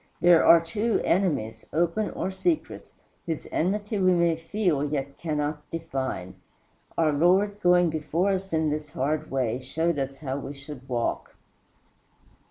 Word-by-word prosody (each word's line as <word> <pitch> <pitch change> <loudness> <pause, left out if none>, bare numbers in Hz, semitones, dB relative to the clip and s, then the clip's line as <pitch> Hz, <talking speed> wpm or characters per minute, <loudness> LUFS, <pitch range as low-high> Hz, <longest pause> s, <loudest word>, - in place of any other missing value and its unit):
There 175 -2 +6
are, 170 - +8
too, 205 +8 -1
enemies 150 - 0
open 175 +6 0
or 190 - -3
secret 320 - -2 0.4
whose 160 -2 -3
enmity 205 +4 -1
we 185 -1 +4
may 170 -1 +3
feel 165 -2 0
yet 140 -2 -3
cannot 150 -2 -2
define. 135 - -4 0.6
Our 160 -2 +3
Lord, 190 +7 +3
going 175 -1 +4
before 160 +5 0
us 190 0 -3
in 160 -2 +1
this 150 0 -4
hard 150 +3 -2
way, 125 -3 -1
showed 160 +4 -1
us 135 0 -3
how 135 -2 -4
we 140 +1 -7
should 140 -2 -10
walk. 120 -2 -2
160 Hz, 145 wpm, -26 LUFS, 140-180 Hz, 0.6 s, are